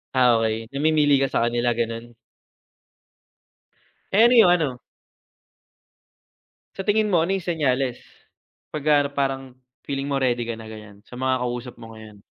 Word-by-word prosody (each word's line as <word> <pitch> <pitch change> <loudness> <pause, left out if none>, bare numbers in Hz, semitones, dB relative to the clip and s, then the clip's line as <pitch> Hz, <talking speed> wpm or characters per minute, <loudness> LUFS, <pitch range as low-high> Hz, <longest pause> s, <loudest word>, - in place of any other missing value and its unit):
Ah, 125 -3 +4
okey. 110 +1 -2
Namimili 145 -1 +2
ka 135 - +1
sa 115 - 0
kanila, 120 0 0
ganun? 115 0 -4 2.0
Eh, 210 +4 +5
ano 240 +1 +6
yung 220 -6 +7
ano? 145 -8 0 2.0
Sa 195 - -5
tingin 210 +1 +2
mo, 175 -5 +2
ano 185 - -2
yung 185 - -5
senyales, 135 -7 -1 0.7
'pag 150 -2 -4 0.2
ano - - -3
parang 135 -1 -1 0.4
feeling 140 0 -3
mo 140 -1 0
ready 120 -2 0
ka 115 -1 -4
na, 110 - -10
ganiyan, 105 -2 -12
sa 125 - -11
mga 130 0 0
kausap 125 0 -4
mo 115 -1 -11
ngayon? 110 -2 -13
130 Hz, 150 wpm, -23 LUFS, 115-145 Hz, 2.0 s, yung